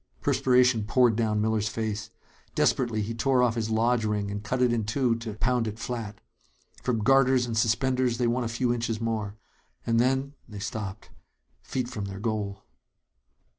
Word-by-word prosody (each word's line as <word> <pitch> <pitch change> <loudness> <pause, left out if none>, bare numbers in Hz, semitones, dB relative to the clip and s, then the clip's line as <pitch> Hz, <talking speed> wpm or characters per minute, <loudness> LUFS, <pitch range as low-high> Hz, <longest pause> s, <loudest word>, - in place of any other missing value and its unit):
Perspiration 125 -4 +3
poured 120 0 +3
down 110 -2 +1
Miller's 110 -1 +1
face. 105 -1 -3 0.5
Desperately, 115 -5 +1
he 110 +3 -4
tore 125 +2 +2
off 120 -2 +3
his 110 -1 -2
lodge 115 +1 +2
ring 105 -2 -1
and 105 0 -5
cut 125 +4 -2
it 125 -1 +3
in 115 -2 0
two 120 +3 +1
to 115 -2 -6
pound 120 +1 +1
it 110 0 -5
flat. 115 -3 -5 0.6
From 115 -4 -1
garters 130 0 +4
and 115 -2 -4
suspenders 125 +2 +1
they 125 - +1
won 120 +2 +1
a - - -2
few 120 +1 0
inches 115 -2 -2
more. 110 -3 -2 0.5
And 115 0 +2
then 135 +3 +1 0.2
they 105 - -8
stopped 105 -1 -6 0.5
feet 130 -2 -3
from 110 -5 -5
their 95 0 -6
goal. 105 -2 -3
115 Hz, 170 wpm, -27 LUFS, 110-125 Hz, 0.6 s, garters